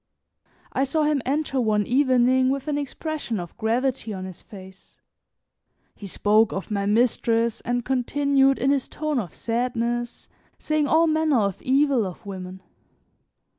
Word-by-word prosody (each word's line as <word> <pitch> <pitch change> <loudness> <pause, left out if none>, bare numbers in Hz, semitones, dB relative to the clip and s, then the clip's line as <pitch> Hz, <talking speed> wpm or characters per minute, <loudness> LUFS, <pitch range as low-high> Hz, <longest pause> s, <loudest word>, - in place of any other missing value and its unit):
I 265 - +1
saw 305 +3 0
him 295 -2 +1
enter 275 -1 0
one 210 -2 +1
evening 255 -1 +3
with 275 +2 -2
an 295 - 0
expression 290 - -4
of 175 -1 -8
gravity 240 +1 -1
on 185 -1 -6
his 185 -2 -9
face; 190 -1 -14 0.9
he 200 - -10
spoke 210 +3 +2
of 195 +2 -5
my 200 -1 -1
mistress 230 +1 +1
and 245 0 -2
continued 270 +1 +2
in 270 +2 +1
his 275 -2 0
tone 305 -3 -2
of 180 -8 -6
sadness, 240 0 -2 0.3
saying 310 -1 0
all 320 +3 +4
manner 310 -5 +2
of 200 -2 -2
evil 265 -4 +2
of 180 +1 -10
women. 185 -1 -8
245 Hz, 145 wpm, -24 LUFS, 215-275 Hz, 0.9 s, all